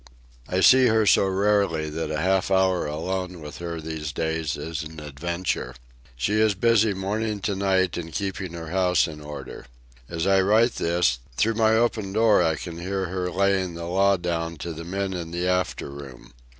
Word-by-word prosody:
I 95 +1 +1
see 130 +3 +7
her 110 -1 +3
so 100 0 +4
rarely 95 -5 +1
that 80 +2 -3
a 75 - -2
half 95 +2 +1
hour 95 -3 +2
alone 90 +4 -3
with 75 -1 -9
her 85 -1 -5
these 80 -1 -5
days 80 -2 -2
is 80 +2 -4
an 80 0 -8
adventure. 75 -2 -3 0.4
She 105 - +1
is 110 -2 +3
busy 110 0 +3
morning 105 +3 -2
to 100 +1 -1
night 95 -2 +1
in 85 -1 -6
keeping 95 0 -4
her 80 -2 -7
house 90 -1 +2
in 75 -2 -9
order. 75 -4 -9 0.4
As 85 0 -2
I 95 0 +4
write 110 +5 +3
this, 85 -8 +1 0.2
through 115 +8 +2
my 110 0 +3
open 110 -4 0
door 110 -2 +4
I 80 -2 +2
can 85 +1 -7
hear 95 +1 -3
her 90 0 -2
laying 95 -1 +1
the 85 0 -6
law 95 +3 +3
down 85 -1 -3
to 85 - -4
the 80 +1 -7
men 95 +2 -2
in 85 -2 -5
the 85 +2 -2
after 90 -5 -1
room. 70 -4 -11
90 Hz, 190 wpm, -24 LUFS, 80-100 Hz, 0.4 s, see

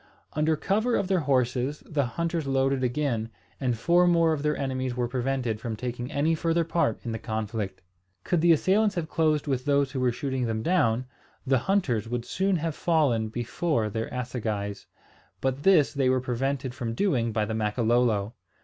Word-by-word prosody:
Under 155 +1 +2
cover 220 +9 +1
of 200 - 0
their 190 -2 +3
horses 130 -1 0
the 150 -3 0
hunters 165 +3 -2
loaded 135 0 +1
again, 120 -3 -1 0.3
and 125 -4 0
four 175 +9 +4
more 165 -2 +4
of 150 - -3
their 150 0 0
enemies 130 -2 -2
were 125 -1 0
prevented 125 -3 -2
from 115 -2 -3
taking 125 +3 -5
any 155 +3 +1
further 165 +1 +1
part 165 -8 0
in 115 - -2
the 115 - -3
conflict. 110 -2 -4 0.4
Could 175 -3 +1
the 170 0 +5
assailants 200 +6 +3
have 170 -3 -2
closed 155 -2 +2
with 130 -3 -1
those 140 -1 +2
who 135 - -3
were 125 -1 +2
shooting 130 -1 -2
them 110 -1 -2
down, 130 -9 +2 0.4
the 135 -1 +3
hunters 125 - 0
would 120 0 -3
soon 190 +1 0
have 165 -1 -1
fallen 145 -11 +1
before 120 0 -1
their 110 +2 -3
assegais, 110 -5 -4 0.5
but 135 +1 -1
this 165 -6 +4
they 135 -3 +2
were 130 0 +3
prevented 130 +1 -2
from 115 -2 -4
doing 120 - +1
by 110 -1 0
the 110 - -4
Makololo. 110 0 +1
130 Hz, 180 wpm, -27 LUFS, 115-155 Hz, 0.5 s, the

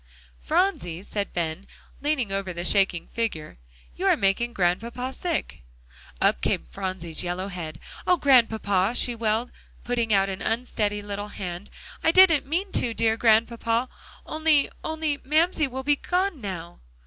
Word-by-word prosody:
"Phronsie," 180 - 0
said 205 -1 -3
Ben, 170 +2 -3 0.3
leaning 280 -8 0
over 195 -1 -2
the 175 0 -4
shaking 180 -3 +2
figure, 185 - -4 0.4
"you - - -1
are - - +5
making 200 +5 +1
Grandpapa 230 +7 -1
sick." 340 - -3 0.6
Up - - +2
came - - 0
Phronsie's 170 - -4
yellow 180 +2 -3
head. 160 -5 -6 0.3
"Oh, 360 - +5
Grandpapa!" 225 - +3
she 245 - +2
wailed, 225 +1 -1 0.3
putting 235 -2 -1
out 195 -1 +4
an 190 -1 -5
unsteady 215 -3 -1
little 205 0 -5
hand, 180 -2 -6 0.3
"I - - +4
didn't 335 -6 +6
mean 370 +6 -1
to, 230 -2 +1
dear 225 -1 +2
Grandpapa, 230 +2 +2 0.4
only 310 -2 +2
only 315 -2 -1
Mamsie 310 +2 +2
will 265 +1 -5
be 290 +1 +3
gone 360 -3 -1
now." 175 -4 -6
225 Hz, 145 wpm, -25 LUFS, 190-270 Hz, 0.6 s, didn't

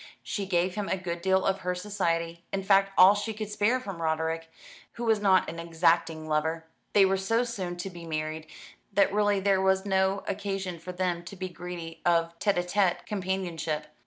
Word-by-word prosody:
She 200 -2 -3
gave 180 0 +1
him 205 0 -3
a 190 - +1
good 175 -2 -4
deal 190 +1 +2
of 195 0 +1
her 180 -1 -2
society, 170 -4 -2
in 195 0 -2
fact 195 0 +4
all 185 +2 +9
she 210 +1 -3
could 215 -1 -5
spare 210 +5 +2
from 195 -9 -7
Roderick, 160 0 -1 0.4
who 235 - -6
was 220 -2 +3
not 190 -2 +4
an 165 +1 -6
exacting 165 -1 +1
lover. 160 +1 0 0.3
They 200 -1 +7
were 190 0 +2
so 225 +5 +1
soon 190 -7 -4
to 175 +2 -4
be 170 -1 -10
married 155 0 -3 0.5
that 195 0 +3
really 205 -1 +2
there 195 -1 +2
was 190 0 +2
no 190 0 +1
occasion 195 -3 -3
for 180 +3 -7
them 180 -1 -1
to 190 - -8
be 185 0 -5
greedy 170 -2 -8
of 170 -1 +2
tête 200 -3 +1
à 175 0 -1
tête 190 -1 +1
companionship. 175 -6 -3
185 Hz, 195 wpm, -28 LUFS, 170-195 Hz, 0.5 s, all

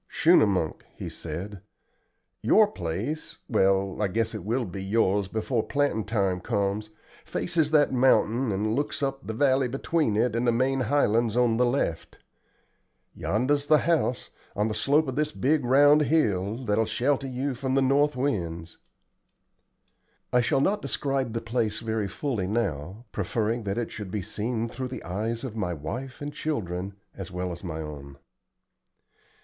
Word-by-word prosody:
"Schunemunk," 100 - +3
he - - -6
said. 90 +5 -6 0.8
"Your 215 - +6
place 110 - -4
well, 95 -2 +2
I 105 - +2
guess 110 +5 -1
it 105 -5 -5
will 120 +5 0
be 95 0 -6
yours 100 -1 +1
before 110 +3 -1
plantin' 140 -4 0
time 95 -5 0
comes 105 +1 -1 0.3
faces 165 -4 0
that 150 -3 +3
mountain 125 -1 +3
and 105 +3 0
looks 145 0 -2
up 135 0 -3
the 110 - -3
valley 135 0 +3
between 135 -1 0
it 115 +1 +1
and 120 +1 0
the - - +5
main 130 +3 +1
highlands 120 -3 +2
on 120 -2 +3
the 125 0 +3
left. 120 -10 -2 1.0
Yonder's 140 +7 0
the 155 - +6
house, 150 -6 0 0.2
on 105 +1 +1
the - - -2
slope 145 +7 +2
of 130 - -3
this 150 0 0
big 145 +1 +1
round 145 +4 +6
hill, 110 - +1
that'll 115 -3 +1
shelter 135 +5 0
you 130 +2 -2
from 130 +1 -2
the - - +4
north 145 +2 +3
winds." 85 -11 -3 1.5
I 125 - +5
shall 135 +3 +1
not 205 +7 +1
describe 135 -4 -1
the 115 - -2
place 115 -2 -1
very 110 -2 -2
fully 105 -1 -2
now, 100 - -2
preferring 110 +4 -1
that 100 +1 -2
it 120 - -2
should 105 -3 -6
be 100 0 -3
seen 110 +3 -2
through 125 +2 -5
the 125 - -7
eyes 110 +6 -3
of 125 -5 -5
my 90 -6 -2
wife 120 - -6
and 145 0 -5
children, 100 - -3 0.2
as 95 -1 -7
well 90 0 -3
as 85 - -8
my 80 -3 -4
own. 70 -3 -8
115 Hz, 160 wpm, -27 LUFS, 100-135 Hz, 1.5 s, Your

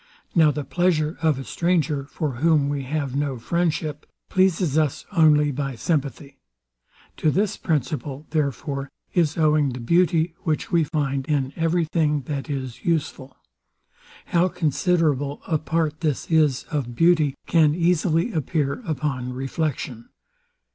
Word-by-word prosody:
Now 160 -3 +5
the 150 0 -2
pleasure 155 +1 +1
of 155 -4 +2
a 135 - -5
stranger, 160 -4 0
for 140 -3 -4
whom 150 -1 +3
we 145 -1 -2
have 140 -1 -2
no 140 -2 -1
friendship, 155 +2 -2 0.2
pleases 185 -5 +2
us 155 -4 0
only 150 -5 +4
by 135 -1 -3
sympathy. 140 0 -3 0.8
To 155 - +2
this 200 +6 +1
principle, 145 -1 -2
therefore, 140 -2 -2 0.2
is 165 -3 +1
owing 155 -2 +3
the 125 - -6
beauty, 165 +4 +2
which 160 -3 -2
we 170 -3 +3
find 140 -4 -2
in 140 -3 0
every 165 +1 +1
thing 150 -2 +1
that 140 +2 -4
is 130 -4 -5
useful. 145 -5 -2 0.9
How 175 +1 +2
considerable 155 -4 0
a 160 -2 +1
part 155 -1 -1
this 155 0 -2
is 150 -5 +3
of 130 -6 -2
beauty 160 -2 +3
can 155 -3 +3
easily 170 +3 +1
appear 150 - -1
upon 135 -4 -2
reflection. 135 -3 -3
150 Hz, 135 wpm, -23 LUFS, 140-165 Hz, 0.9 s, Now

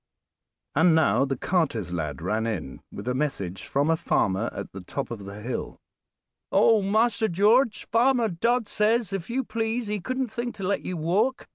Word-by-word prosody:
And 160 +2 +4
now 160 -3 +3
the 135 -1 -2
carter's 120 - 0
lad 75 -4 -3
ran 110 +5 0
in 85 - -4
with 100 +4 -8
a 125 - +1
message 100 -10 -3
from 145 +4 +1
a - - +4
farmer 110 - 0
at - - -7
the 95 - -8
top 135 +10 -5
of 105 -4 -6
the 100 +2 -8
hill. 120 +1 -4 0.7
"Oh! 220 -2 +5
Master 220 +2 +2
George, 220 +6 +3
Farmer 235 +1 +3
Dodd 230 +5 0
says, 215 -1 +1
if 195 0 -4
you 260 +3 0
please, 225 +1 -2
he 210 0 -2
couldn't 255 +4 -3
think 235 +2 -4
to 195 - -7
let 200 +2 0
you 185 - -4
walk. 200 - 0
180 Hz, 180 wpm, -26 LUFS, -, 0.7 s, Oh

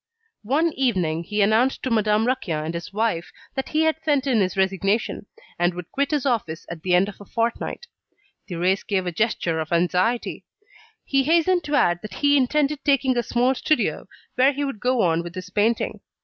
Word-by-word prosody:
One 305 +7 +1
evening, 180 -11 0
he 210 +2 +1
announced 225 +6 +2
to 260 - -2
Madame 215 0 +2
Raquin 175 -12 -1
and 160 - -3
his 170 +1 -6
wife 210 -5 -1 0.2
that 265 -1 -3
he 310 - +1
had 315 0 +1
sent 290 -4 +1
in 245 -6 +2
his 185 +1 -1
resignation, 195 +3 0 0.3
and 175 0 +1
would 180 -2 -8
quit 280 0 0
his 295 -3 -1
office 205 - -1
at 165 -2 -7
the 180 +1 +2
end 185 +2 +3
of 205 - -10
a - - -8
fortnight. 230 - -2 0.6
Thérèse 180 +2 0
gave 190 -3 0
a 180 - -2
gesture 170 -4 0
of 160 +1 -4
anxiety. 180 +7 0 0.6
He 275 -1 +1
hastened 340 +3 +3
to 295 - -1
add 175 -9 +3
that 210 -3 -8
he 285 0 +3
intended 285 +2 +1
taking 275 -2 +2
a 240 - +2
small 245 +2 +1
studio 305 +3 0 0.3
where 265 +3 +4
he 285 +1 -2
would 275 -6 -5
go 250 +1 +1
on 165 -1 +2
with 170 +1 -9
his 185 0 -7
painting. 220 +3 0
220 Hz, 195 wpm, -23 LUFS, 180-270 Hz, 0.6 s, where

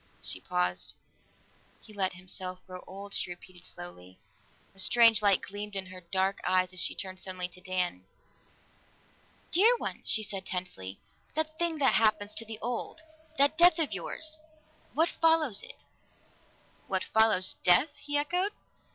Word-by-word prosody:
She - - -1
paused. 90 +2 -1 0.8
"He 215 - -16
let 190 -2 0
himself 185 0 -2
grow 185 -1 -9
old," 200 +2 -9
she - - +1
repeated 175 0 -11
slowly. 90 +1 -9 0.6
A 195 - -9
strange 230 +2 +6
light 200 -3 +4
gleamed 205 +1 -6
in 190 -1 +1
her 185 0 -11
dark 190 +2 0
eyes 185 0 +2
as 185 - -4
she - - 0
turned 185 -1 -6
suddenly 185 -1 -4
to 180 +1 -15
Dan. 180 - -2 1.5
"Dear 440 +8 +6
one!" - - -4
she 220 - +2
said 200 -2 -3
tensely. 140 - -5 0.4
"That 315 0 -2
thing 340 -2 0
that 275 -3 +3
happens 215 -1 +2
to 220 +2 +2
the 220 0 -6
old 245 +6 -4 0.3
that 285 +3 +4
death 345 -1 +8
of 320 -3 0
yours! 315 -1 -3 0.6
What 325 +3 +3
follows 320 -9 +2
it?" - - -12 1.0
"What - - 0
follows 220 -4 +3
death?" 180 - +5
he 290 0 -2
echoed. 360 +7 0
200 Hz, 150 wpm, -30 LUFS, 185-285 Hz, 1.5 s, death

